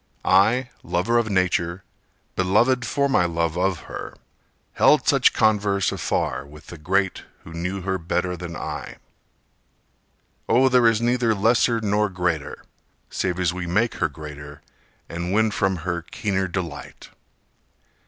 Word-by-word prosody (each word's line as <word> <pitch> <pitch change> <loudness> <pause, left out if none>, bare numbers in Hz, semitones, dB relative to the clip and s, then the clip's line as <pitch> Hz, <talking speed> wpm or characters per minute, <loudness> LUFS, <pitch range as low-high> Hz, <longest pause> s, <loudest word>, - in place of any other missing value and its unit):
I, 115 +7 +3
lover 115 +7 +1
of 115 -2 -1
Nature, 90 -2 0 0.5
beloved 115 +7 +2
for 140 0 +1
my 130 -10 +2
love 85 -1 -1
of 90 -1 0
her, - - -8 0.6
Held - - +4
such - - +5
converse 100 -3 +2
afar - - -2
with 75 +1 -15
the 85 - -11
great 95 +4 0 0.2
Who 80 - -11
knew 90 +3 -3
her 95 0 -2
better 90 +2 -1
than 85 -1 -7
I. - - -6 1.5
Oh, 130 +3 +5
there 125 -2 +5
is 115 -1 +2
neither 120 -1 +2
lesser 115 +3 +2
nor 105 0 +1
greater, 90 -5 -3 0.5
Save 90 -1 -2
as 90 -2 +1
we 90 -1 -5
make 105 +7 +1
her - - 0
greater 75 0 -10 0.4
and 85 +2 -4
win 110 +1 +3
from 95 -2 0
her 85 -1 -2
keener 95 +2 -2
delight. 85 -6 -6
95 Hz, 140 wpm, -23 LUFS, 85-110 Hz, 1.5 s, such